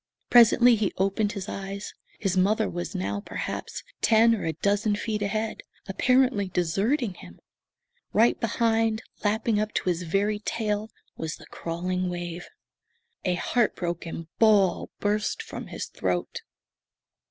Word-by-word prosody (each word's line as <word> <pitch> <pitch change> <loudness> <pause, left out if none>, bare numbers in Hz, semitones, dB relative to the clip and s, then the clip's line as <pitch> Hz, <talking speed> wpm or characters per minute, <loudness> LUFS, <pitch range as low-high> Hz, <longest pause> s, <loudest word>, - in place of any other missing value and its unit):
Presently 240 0 +7
he 210 -3 0
opened 195 +2 +1
his 200 -1 -5
eyes. 195 0 -5 0.2
His 195 -3 -1
mother 210 +4 +3
was 175 +3 -5
now 190 +2 -2
perhaps - - -5 0.2
ten 230 +1 +5
or 225 - -2
a 160 - 0
dozen 205 +5 +1
feet 210 0 -3
ahead, 215 +2 -2 0.3
apparently 250 0 +2
deserting 195 - 0
him. - - -13 0.7
Right 230 +3 +4
behind, 225 -1 +1 0.2
lapping 215 +1 +1
up 215 0 -2
to - - 0
his 175 0 0
very 200 +5 0
tail, 215 0 -2 0.3
was 160 0 -3
the - - -14
crawling 180 +2 -3
wave. 175 0 -5 0.8
A 180 -1 +2
heart 235 +6 +1
broken 170 -2 -4
bawl 205 -5 +4
burst 205 0 0
from - - -7
his - - -5
throat. 90 -2 -2
205 Hz, 135 wpm, -26 LUFS, 180-220 Hz, 0.8 s, Presently